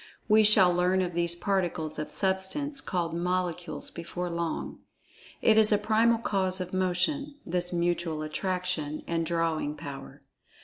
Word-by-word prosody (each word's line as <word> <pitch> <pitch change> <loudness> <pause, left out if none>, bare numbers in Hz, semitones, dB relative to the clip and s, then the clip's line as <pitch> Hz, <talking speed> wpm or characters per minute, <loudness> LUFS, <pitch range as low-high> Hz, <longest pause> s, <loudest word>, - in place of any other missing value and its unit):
(We 215 0 +6
shall 200 -4 +7
learn 180 +1 +2
of 175 -1 -3
these 170 0 0
particles 175 -5 -1
of 150 0 -4
Substance 195 - -1
called 170 -3 -2
Molecules 180 0 -3
before 175 +1 -5
long.) 170 -1 -3 0.6
It 220 -1 +6
is 215 0 +4
a 210 - +5
primal 220 +2 +3
cause 190 -4 -1
of 185 0 -5
Motion, 185 +11 0
this 175 0 -1
mutual 170 -2 -1
Attraction, 175 -2 -2
and 165 -1 -1
drawing 165 -3 -1
power. 140 -1 -9
180 Hz, 140 wpm, -28 LUFS, 170-195 Hz, 0.6 s, shall